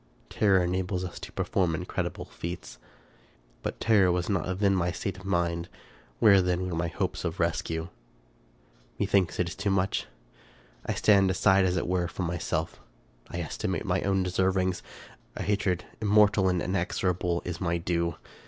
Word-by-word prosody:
Terror 95 -4 +3
enables 90 +1 -1
us 85 - -7
to - - -8
perform 90 -4 0
incredible - - -3
feats; 85 -8 -7 0.8
but - - -4
terror 100 -5 +4
was 90 +2 -1
not 95 -1 -1
then 100 -1 +3
the 90 0 0
state 95 0 -3
of 95 - -12
my 90 -3 +2
mind: 85 0 -5 0.5
where 100 - +6
then 90 0 0
were 90 - -3
my 85 +1 0
hopes 80 - -3
of 85 +1 -3
rescue? 80 0 -1 1.1
Methinks 95 -3 +1
it 90 - +2
is - - -7
too 100 +1 -1
much. 95 0 0 0.8
I - - 0
stand 100 -3 +4
aside, 95 +1 +4
as 90 0 +1
it - - -1
were, 90 -1 0
from 90 +1 -4
myself; 85 -1 -2 0.5
I - - -4
estimate - - -3
my - - +1
own 95 -1 +1
deservings; 95 0 +1 0.5
a - - -3
hatred, 95 -3 0 0.2
immortal 105 -2 +4
and 90 -1 0
inexorable, 90 -1 -1
is 85 0 -5
my 85 -2 +1
due. 85 -1 -1
90 Hz, 160 wpm, -28 LUFS, 85-95 Hz, 1.1 s, where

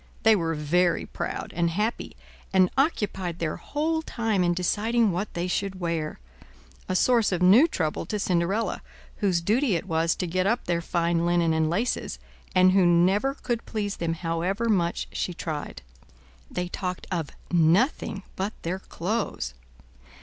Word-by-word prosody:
They 220 0 +6
were 165 -4 -1
very 170 +4 +1
proud - - -5
and 170 0 +2
happy, 210 +7 -2 0.4
and 185 -1 +4
occupied 205 - 0
their 165 -3 -2
whole 320 +2 -1
time 225 -10 0
in 175 0 +2
deciding 215 +5 +1
what 185 +4 -3
they 170 +1 -1
should 190 +1 -2
wear; 165 -3 -2 0.7
a 185 - 0
source 235 +1 +3
of 180 -1 0
new 215 - +7
trouble 160 - -2
to 215 - -2
Cinderella, 190 +3 0 0.4
whose 185 -5 +1
duty 220 +4 +2
it 165 - -2
was 165 -2 +1
to - - -2
get 185 +2 0
up 235 +3 0
their 170 -1 0
fine 170 -1 0
linen 170 -1 +2
and 160 0 +1
laces, 210 +9 -1 0.4
and 185 0 +6
who 190 0 +4
never 185 +10 +3
could 240 -5 -3
please 205 -3 -3
them 165 -1 -1
however 175 +7 -1
much 175 -5 +1
she 180 - -3
tried. 150 - -5 0.7
They 180 0 -3
talked 180 0 -4
of 165 -5 -2 0.2
nothing 180 - +2
but 195 +3 -2
their 180 +3 -2
clothes. 190 - -3
180 Hz, 155 wpm, -26 LUFS, 170-210 Hz, 0.7 s, new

